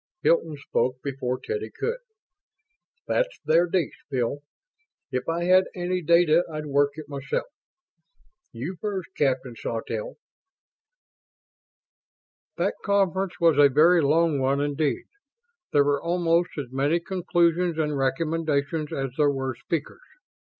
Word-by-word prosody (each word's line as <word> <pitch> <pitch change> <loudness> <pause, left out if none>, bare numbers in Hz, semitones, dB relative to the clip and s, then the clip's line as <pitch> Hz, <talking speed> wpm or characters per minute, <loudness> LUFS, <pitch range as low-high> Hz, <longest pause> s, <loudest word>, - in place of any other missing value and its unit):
Hilton 165 -2 +2
spoke 130 -2 -1
before 130 -2 -3
Teddy 440 -1 -4
could. 465 +2 -3 1.1
"That's - - 0
their 170 +3 +4
dish, 175 -3 -2
Bill. 130 +1 -1 0.7
If 125 +2 -2
I 170 +1 -1
had 185 +1 +5
any 180 0 -1
data 170 0 +4
I'd 155 -1 -5
work 145 0 +2
it 155 -2 -9
myself. 140 -2 -3 1.1
You 140 +10 -6
first, 195 -4 -3
Captain 130 -3 0
Sawtelle." 310 - -4 2.4
That - - +1
conference 195 -2 0
was 165 -4 +4
a 145 -1 +8
very 165 +5 +5
long 155 +1 +2
one 135 +1 +1
indeed. 145 0 -1 0.7
There 145 - +5
were 145 0 +1
almost 170 0 +1
as 135 -4 -5
many 140 +6 +1
conclusions 175 -1 +1
and 150 -2 0
recommendations 150 +2 -1
as 135 -1 -3
there 145 -1 +5
were 135 -2 -2
speakers. 145 - -4
155 Hz, 120 wpm, -25 LUFS, 140-175 Hz, 2.4 s, a